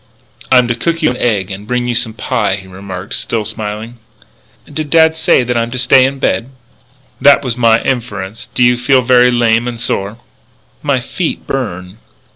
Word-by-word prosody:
"I'm 125 -2 +5
to 120 - 0
cook 165 +7 -2
you - - +3
an 125 - -5
egg 100 -5 0
and 100 +2 -8
bring 125 0 -1
you 120 - 0
some 115 -2 0
pie," 115 -6 -1
he 95 -1 -10
remarked, 95 0 -8
still 110 -2 -2
smiling. 110 +2 -6 0.7
"Did 150 0 -5
dad 160 0 +4
say 160 - +2
I 120 -1 0
am 115 - -3
to 130 - -5
stay 130 +1 +5
in 135 +1 -2
bed?" 125 -2 -1 0.7
"That 140 0 +6
was 125 -3 -2
my 115 -2 +3
inference. 110 -5 -4
Do 125 - 0
you 120 0 +3
feel 130 +1 +3
very 125 0 +5
lame 120 -1 +2
and 120 -1 -5
sore?" 100 -1 -3 0.6
"My 140 -4 0
feet 160 +7 -4
burn." 95 -9 -5
120 Hz, 185 wpm, -14 LUFS, 110-130 Hz, 0.7 s, That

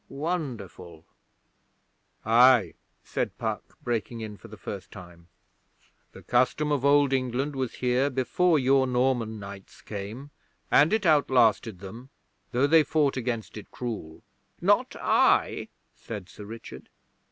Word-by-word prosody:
Wonderful!' 115 - -5 1.2
'Aye,' 120 0 +5 0.3
said - - -3
Puck, - - -5
breaking 120 -1 -3
in 110 -1 -6
for 90 - -14
the - - -12
first - - -7
time. 85 -1 -13 0.9
'The - - -13
Custom 130 +5 +1
of 140 -3 0
Old 140 -1 +4
England 130 +2 -1
was 130 -3 -3
here 125 +2 +1
before 155 +6 +2
your 135 0 +3
Norman 125 -3 0
knights 100 -1 -11
came, 110 +8 -7 0.4
and 150 +5 +5
it 220 -2 +1
outlasted 125 - +3
them, 115 +7 -10 0.4
though 125 +3 +2
they 160 +2 +6
fought 150 -2 +1
against 115 -4 -4
it 105 - -10
cruel.' 110 -10 -6 0.4
'Not - - +2
I,' - - +2 0.3
said 100 -5 -8
Sir 105 - -11
Richard. 115 +2 -10
125 Hz, 130 wpm, -27 LUFS, 110-140 Hz, 1.2 s, they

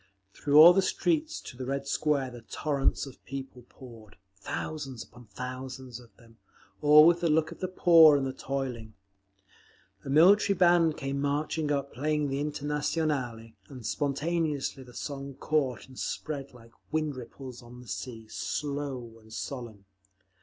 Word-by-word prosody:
Through 145 0 -1
all 170 +3 +11
the 195 - +3
streets 320 - 0
to - - -10
the 130 0 -6
Red 140 0 -2
Square 140 -3 0
the 120 -1 -10
torrents 140 +5 -1
of 135 - -13
people 130 -2 -8
poured, 115 -5 -14 0.2
thousands 135 +5 -5
upon 120 0 -17
thousands 130 +2 -7
of 120 -2 -19
them, 115 -1 -20 0.4
all 150 +1 +8
with 170 +1 +5
the 170 - +2
look 160 +1 +2
of - - -10
the 185 - -2
poor 165 -4 +7
and 135 - -1
the 130 - -3
toiling. 125 -5 -5 1.1
A - - -7
military 190 +7 +5
band 170 -3 +4
came 140 0 -3
marching 150 +1 -1
up, 140 -1 -2
playing 150 +3 0
the 135 +1 -2
Internationale, 145 -5 -2 0.2
and 125 -5 -10
spontaneously 145 -1 -1
the 125 -2 -14
song 140 -2 -6
caught 135 -3 -1
and 130 -1 -12
spread 140 -3 -4
like 115 -2 -16 0.2
wind 155 -2 -1
ripples 125 +1 -9
on 125 +1 -13
a - - -17
sea, 115 +1 -6
slow 135 -3 -4
and 110 0 -19
solemn. 115 -4 -7
140 Hz, 155 wpm, -29 LUFS, 125-150 Hz, 1.1 s, all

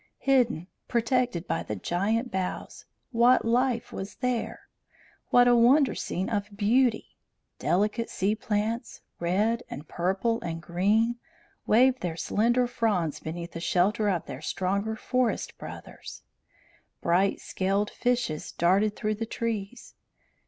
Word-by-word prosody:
Hidden, 250 -10 +2 0.2
protected 235 -6 0
by 165 - -1
the 105 - -4
giant 210 - -1
boughs, 185 -1 -4 0.3
what 240 +1 +4
life 240 0 +1
was 195 +2 -6
here! 250 -3 -2 0.7
What 245 0 +6
a 245 - +6
wonder 260 +4 +5
scene 185 +2 -3
of 205 -2 -3
beauty! 230 +2 +1 0.4
Delicate 210 +6 0
sea 195 +3 0
plants, 220 +2 -2 0.2
red 210 +7 +1
and 150 +3 -8
purple 190 +7 0
and 165 -5 -4
green, 205 +8 +1 0.5
waved 255 +4 +4
their 170 -2 -3
slender 240 +8 +2
fronds 210 -10 0
beneath 170 +2 -6
the 165 - -6
shelter 195 +5 +2
of 180 -4 -1
their 130 - -7
stronger 200 +7 -1
forest 250 +2 -1
brothers. - - -9 0.8
Bright 185 +3 +2
scaled 195 +2 -1
fishes 245 -11 -1
darted 195 +5 +2
through 215 -1 -1
the 225 +2 -4
trees. 230 0 -4
215 Hz, 125 wpm, -27 LUFS, 185-235 Hz, 0.8 s, What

